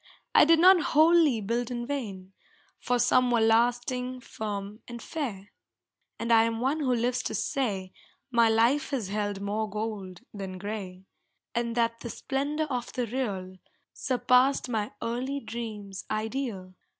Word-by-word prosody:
I - - +7
did 330 +1 +6
not 365 +2 +7 0.2
wholly 315 -7 +5
build 230 +3 -1
in 240 -1 -3
vain, 200 -9 -5 0.5
For 245 - 0
some 250 +1 +3
were 240 -1 +3
lasting, 245 +3 +1
firm 210 -2 -6
and 240 -1 -7
fair. 225 -10 -5 0.7
And 230 0 +1
I 225 0 +6
am 225 0 -2
one 270 +6 0
who 270 -4 0
lives 245 +2 0
to - - -3
say 195 -9 -2 0.4
My 235 -2 +4
life 235 +6 +3
has 250 -9 -2
held 205 -1 -2
more 210 +2 -2
gold 205 -4 -5
than 190 -2 -6
gray, 190 -2 -6 0.5
And 235 -1 -1
that 230 -1 +1
the 235 - -6
splendor 285 +6 -2
of 250 -4 -3
the 250 - -1
real 200 -7 -4 0.4
Surpassed 255 +1 +2
my 215 -3 -1
early 255 +4 -2
dream's 215 -5 -6
ideal. 215 -4 -3
230 Hz, 150 wpm, -28 LUFS, 205-255 Hz, 0.7 s, I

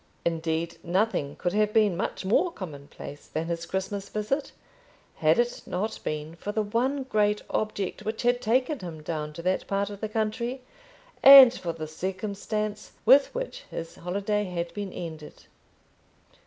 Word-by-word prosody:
Indeed 165 0 -1
nothing 180 -5 0
could 175 0 -2
have 210 0 +2
been 210 -5 +4
much 190 - -3
more 300 - +3
commonplace 145 - -9
than 160 +1 -3
his 170 0 -3
Christmas 195 +2 -3
visit, 270 +7 -2 0.7
had - - +4
it 485 +1 0
not 215 +5 -2
been 155 +1 -4
for 200 +5 -5
the 215 +1 0
one 255 +7 0
great 210 -4 +1
object 205 -3 -2
which 220 +2 -3
had 245 0 +2
taken 255 +6 +1
him 165 -4 -8
down 150 -1 -3
to 170 - -8
that 185 +1 0
part 200 +1 -1
of 200 - -9
the 215 - -2
country, 235 +4 -2 0.6
and 270 -3 +11
for 175 -8 -4
the 160 -1 -6
circumstance 205 +5 -4
with 270 +4 +7
which - - -5
his 165 0 -6
holiday 200 +4 -1
had 170 -2 -4
been 200 -1 -4
ended. 160 -4 -8
200 Hz, 155 wpm, -27 LUFS, 170-220 Hz, 0.7 s, and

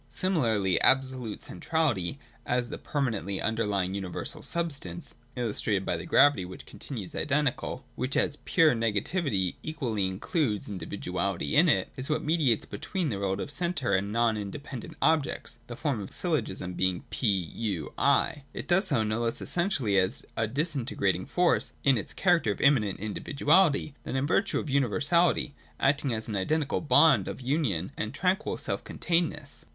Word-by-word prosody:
Similarly 115 - +1
absolute 130 -4 +2
centrality, 130 - -1 0.3
as 125 -1 0
the - - -6
per 145 - -4
manently 100 -6 -1
underlying 105 -4 0
universal 95 -2 -4
substance 145 - -3 0.2
(illustrated 105 -4 0
by - - 0
the 85 - -6
gravity 145 -8 +5
which 90 +1 -9
continues 110 -10 -7
identical), 145 -2 -1
w^hich 130 +3 -2
as 145 - +1
pure 165 -3 +3
negativity 115 - 0
equally 120 -11 -2
includes 105 - -1
individuality 90 -3 -3
in - - +6
it, - - +2
is 130 +3 -5
what 155 - 0
mediates 150 -8 +2
between 165 - -3
the 100 - -3
relative 100 +5 -2
centre 175 -5 -1
and 95 +1 +2
the - - -6
non 115 0 +2
inde 105 +8 -6
pendent 145 +3 -8
objects 155 -6 0
(the 120 - -6
form 140 -3 -1
of 95 - -7
syllogism 120 - -2
being 95 -1 0
P 125 - -1
— 95 -5 0 0.2
U 85 -6 -4
— - - -32 0.3
I). 145 - -7
It - - -6
does 190 +3 +4
so 135 -10 +2
no 110 +1 -1
less 115 -1 -1
essentially 145 - +2
as 95 +6 -1
a 115 - 0
disintegrating 125 - -1
force, 180 -1 +1
in 135 -2 +5
its 105 - -4
character 175 - +2
of - - -5
immanent 120 -9 +3
individuality, 145 - +2
than - - -5
in 130 +1 +1
virtue 195 +6 +1
of - - -5
universality, 145 +5 +2 0.3
acting 140 -1 +2
as 110 0 -2
an 110 - -3
identical 145 +10 0
bond 160 +1 +5
of - - -5
union 125 - -1
and 110 +5 -4
tranquil 185 +6 0
self - - -3
containedness. 160 -4 -2
125 Hz, 165 wpm, -28 LUFS, 100-150 Hz, 0.3 s, in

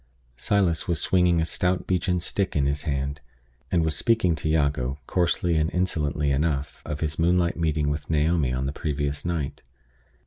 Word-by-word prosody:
Silas 90 +1 +1
was 85 -3 +1
swinging 90 -1 +3
a 80 - +1
stout 90 +2 0
beechen 90 0 0
stick 95 +2 -1
in 70 -2 +2
his 70 +1 0
hand, 70 +1 -2 0.5
and 85 -2 +2
was 80 - +1
speaking 110 -7 +2
to 80 0 -3
Jago, 70 -4 +1
coarsely 85 +1 +1
and 80 +1 +1
insolently 75 -5 0
enough, 70 0 -1
of 75 -1 -4
his 75 0 -2
moonlight 85 +1 +2
meeting 80 -2 0
with 75 0 -3
Naomi 80 -3 +2
on 65 +1 -2
the 70 - -2
previous 75 -2 -3
night. 80 -5 -3
80 Hz, 170 wpm, -25 LUFS, 70-85 Hz, 0.5 s, swinging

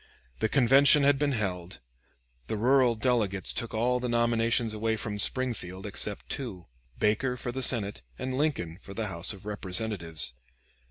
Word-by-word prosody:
The 110 - +1
convention 140 +3 +6
had 140 0 +4
been 145 -1 +1
held; 90 -6 -3 0.7
the 110 - -3
rural 125 +1 +3
delegates 110 -5 +1
took 115 - -2
all 125 +3 +1
the 125 0 -3
nominations 115 -1 +1
away 110 +1 -1
from 105 -1 -5
Springfield 100 -6 -1
except 105 0 -2
two, 105 -10 -6 0.3
Baker 125 +5 +1
for 120 - -4
the 130 +2 -4
Senate, 105 - +2 0.2
and 130 0 -4
Lincoln 130 - -1
for 100 - -11
the 110 -3 -3
House 85 -2 -2
of 100 -1 -11
Representatives. 95 - -2
110 Hz, 155 wpm, -28 LUFS, 100-125 Hz, 0.7 s, convention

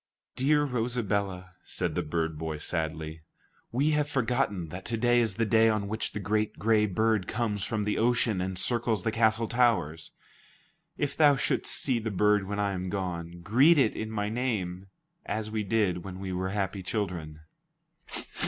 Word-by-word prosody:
"Dear 150 +3 +3
Rosabella," 105 -8 -1
said - - -2
the - - 0
bird 80 0 -2
boy 80 -1 -3
sadly, 80 0 -3 0.5
"we 140 +6 +2
have 150 -1 +1
forgotten 120 - 0
that 90 +4 -7
to 115 - -2
day 120 +1 +3
is 110 -5 0
the 115 - +1
day 115 +1 +5
on 105 -2 0
which 110 +2 -3
the - - -3
great 105 +1 -1
gray 105 +3 +3
bird 110 0 +1
comes 105 -5 -1
from 110 -2 -1
the 105 0 -1
ocean 115 -4 +2
and 95 0 -3
circles 115 -2 0
the 110 - 0
castle 110 0 +2
towers. 110 -11 +1 0.9
If 145 -1 -1
thou 145 -2 +6
shouldst 135 - -1
see 130 -4 +1
the 110 0 -3
bird 105 0 +2
when 100 0 -3
I 100 -1 +1
am 95 -1 -3
gone, 85 -3 -4
greet 130 - +5
it 130 -6 +3
in 110 - -4
my 105 -2 -2
name, 105 -6 -2 0.4
as 110 0 -3
we 110 0 -1
did 100 -4 +1
when 95 -1 -7
we 95 -1 -4
were 95 +1 -2
happy 100 -1 -2
children." 90 -6 -4
105 Hz, 175 wpm, -28 LUFS, 90-115 Hz, 0.9 s, thou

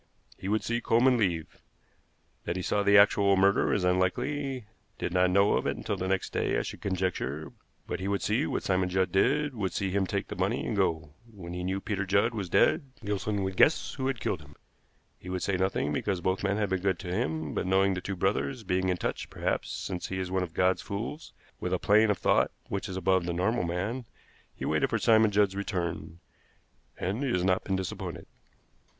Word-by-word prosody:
He 95 - -7
would 110 +2 +1
see 120 0 -1
Coleman 125 +3 +4
leave. 90 -8 -1 0.8
That 85 - -2
he 90 - -3
saw 100 - +1
the 100 +1 +5
actual 100 -1 +5
murder 100 +1 +3
is 100 - +1
unlikely, 125 +9 0 0.3
did 90 - -3
not 90 0 +4
know 100 +2 +4
of - - 0
it - - -1
until - - -3
the 95 - -3
next 95 0 -1
day, - - 0
I - - 0
should - - -7
conjecture; 90 -6 -2 0.3
but - - -4
he 95 - -3
would 100 0 -1
see - - +1
what - - -2
Simon 95 -1 +1
Judd 95 +1 +1
did, 140 +9 +2
would 105 -6 -2
see 95 -2 -1
him 95 0 +1
take - - -2
the - - -5
money - - -1
and - - -2
go. 80 -2 0 0.2
When 90 -5 -9
he 90 0 -4
knew 95 +2 -1
Peter 100 -1 -2
Judd 100 +5 +2
was 100 -5 -4
dead, 140 - +3 0.2
Gilson 100 0 -1
would 95 0 -3
guess 150 - +3
who 130 -1 -2
had 135 -4 -1
killed - - -2
him. 70 0 -16 0.6
He 90 - -10
would 90 -1 -2
say 100 - 0
nothing, 90 -5 0
because 95 +4 -1
both 95 +3 -1
men 100 0 +1
had 105 -2 0
been 95 -1 -1
good 95 -1 +1
to 90 +1 -5
him; 80 -3 -2
but - - -2
knowing 95 +1 +3
the 90 - -3
two 95 +1 -4
brothers, 105 +7 -1
being 95 -1 0
in 90 - +1
touch, - - -3
perhaps, - - -2
since 90 -1 -4
he 95 - -4
is 95 -1 -3
one 95 0 +1
of 85 -3 -5
God's 90 0 +2
fools, 115 +10 -5 0.3
with 90 - -2
a - - +3
plane 105 +4 +4
of 105 - +2
thought - - +3 0.2
which 100 +1 -3
is 95 - -4
above 95 -1 +2
the 85 - -1
normal 90 +3 0
man, 100 +9 -3 0.5
he - - -5
waited - - +1
for - - +1
Simon 110 -1 +5
Judd's 100 -1 +2
return, 90 -5 -3 0.8
and 100 +8 -2
he 135 - 0
has 90 -4 +1
not 95 -1 +2
been 95 - -1
disappointed." 95 -1 -5
95 Hz, 220 wpm, -29 LUFS, 90-105 Hz, 0.8 s, the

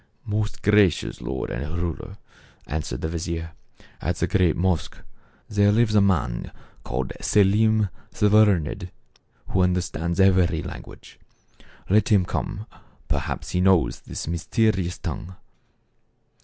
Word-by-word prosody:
" - - -40
Most 105 0 -2
gracious 105 -4 +3
lord 65 -1 -4
and 75 +7 -4
ruler," 90 +3 -4 0.5
answered 75 -4 -4
the - - -1
vizier, 85 0 -4 0.3
" - - -25
at - - -1
the - - 0
great 90 -5 +2
mosque, 90 -2 0 0.5
there 105 -1 +3
lives 110 0 +2
a 105 - +5
man 90 -11 0 0.3
called 65 +1 -3
Selim 105 +1 +3 0.2
the 105 - +1
Learned, 100 -5 +3 0.6
who 95 - +1
understands 90 -1 0
every 90 -3 +4
language. 90 -2 -10 0.7
Let 105 +5 +3
him 100 -5 +4
come; 105 +3 -4 0.4
perhaps - - -2
he 90 - +1
knows 95 -4 +3
this - - -7
mysterious 90 +2 0
tongue." 90 +2 -6
95 Hz, 130 wpm, -24 LUFS, 85-105 Hz, 0.7 s, a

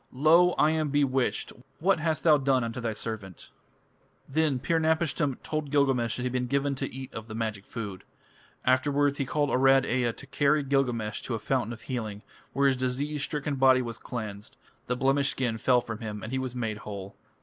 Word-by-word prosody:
Lo! 165 +6 +5
I 150 - +3
am 155 -2 0
bewitched. 135 -3 0 0.3
What 185 +1 +3
hast 160 0 -1
thou 155 -3 +6
done 135 -2 +2
unto 115 +2 -4
thy 115 -1 -1
servant?" 105 -5 -6 0.8
Then 150 -1 +1
Pir 165 +6 0
napishtim 160 -3 +1
told 155 -2 -3
Gilgamesh 135 -5 +2
that 125 - -4
he - - -2
had 125 - -2
been 125 -1 0
given 140 +2 0
to 135 0 -4
eat 130 0 -8
of 110 0 -7
the 110 - -7
magic 110 -3 -3
food. 105 -6 -6 0.6
Afterwards 140 +2 +2
he 135 - -1
caused 145 0 0
Arad 135 +1 +5
Ea 125 -1 +1
to - - -12
carry 145 +1 +2
Gilgamesh 125 -6 0
to 120 - -3
a - - -1
fountain 115 +1 -1
of 120 - -8
healing, 110 -5 -4 0.3
where 140 - +1
his 135 -1 +2
disease 135 +4 -2
stricken 145 0 -2
body 130 -1 +5
was 115 -2 -6
cleansed. 105 -4 -7 0.3
The 125 - 0
blemished 135 +1 +2
skin 125 -5 -1
fell 125 +1 +4
from 115 -2 -6
him, 105 -2 -6
and 115 - -6
he 130 - -1
was 130 -1 -4
made 110 -4 -2
whole. 100 -2 -7
130 Hz, 200 wpm, -28 LUFS, 115-145 Hz, 0.8 s, thou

